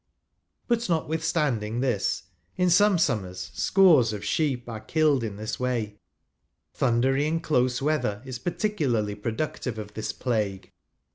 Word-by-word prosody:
But, 235 Hz, -2 st, +2 dB
notv/ithstauding 160 Hz, -, -1 dB
this, 120 Hz, -11 st, 0 dB, 0.3 s
in 180 Hz, -1 st, +3 dB
some 205 Hz, +2 st, +5 dB
summers 95 Hz, -, -1 dB
scores 160 Hz, -, +4 dB
of 105 Hz, -, -6 dB
sheep 135 Hz, -6 st, 0 dB
are 110 Hz, -2 st, -5 dB
killed 150 Hz, 0 st, +2 dB
in 105 Hz, -3 st, -4 dB
this 110 Hz, +1 st, -4 dB
way: 115 Hz, -5 st, -2 dB, 0.7 s
thundery 135 Hz, +3 st, +2 dB
and 165 Hz, +1 st, -1 dB
close 125 Hz, -3 st, +1 dB
weather 125 Hz, -8 st, 0 dB
is 130 Hz, -2 st, -6 dB
peculiarly 135 Hz, -, -1 dB
productive 115 Hz, +3 st, -3 dB
of 105 Hz, -1 st, -7 dB
this 110 Hz, -, -3 dB
plague. 105 Hz, -6 st, -2 dB
125 Hz, 130 wpm, -26 LUFS, 110-155 Hz, 0.7 s, some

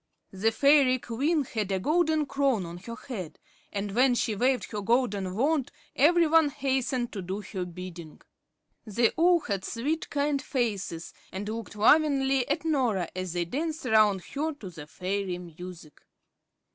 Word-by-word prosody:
The 200 Hz, +4 st, +1 dB
fairy 275 Hz, +1 st, +5 dB
queen 280 Hz, +7 st, 0 dB
had 215 Hz, -5 st, -3 dB
a 190 Hz, -, +1 dB
golden 315 Hz, -, +2 dB
crown 275 Hz, -7 st, +1 dB
on 170 Hz, +1 st, -7 dB
her 230 Hz, +5 st, -8 dB
head, 190 Hz, -, -7 dB, 0.3 s
and 200 Hz, 0 st, -3 dB
when 250 Hz, +2 st, +4 dB
she 225 Hz, -, 0 dB
waved 255 Hz, +4 st, +1 dB
her 210 Hz, -2 st, -3 dB
golden 200 Hz, -5 st, 0 dB
wand, 280 Hz, +3 st, +1 dB, 0.2 s
every 335 Hz, +4 st, +5 dB
one 320 Hz, -1 st, +4 dB
hastened 260 Hz, -3 st, -1 dB
to 200 Hz, -, -4 dB
do 190 Hz, +3 st, -4 dB
her 190 Hz, -2 st, -5 dB
bidding. 175 Hz, -2 st, -9 dB, 0.6 s
They 230 Hz, +1 st, +2 dB
all 345 Hz, +1 st, +4 dB
had 195 Hz, -7 st, -3 dB
sweet, 285 Hz, +10 st, -2 dB
kind 285 Hz, -1 st, 0 dB
faces, 205 Hz, -, -3 dB, 0.2 s
and 195 Hz, +3 st, -5 dB
looked 220 Hz, 0 st, -5 dB
lovingly 270 Hz, +2 st, +3 dB
at 310 Hz, +3 st, -1 dB
Norah 245 Hz, -, +1 dB
as 185 Hz, -2 st, -4 dB
they 175 Hz, -1 st, -1 dB
danced 310 Hz, -, -3 dB
around 215 Hz, -4 st, +4 dB
her 310 Hz, +3 st, -3 dB
to 210 Hz, -10 st, -10 dB
the 155 Hz, -3 st, -10 dB
fairy 185 Hz, +3 st, -3 dB
music. 175 Hz, -2 st, -11 dB
230 Hz, 160 wpm, -28 LUFS, 190-280 Hz, 0.6 s, fairy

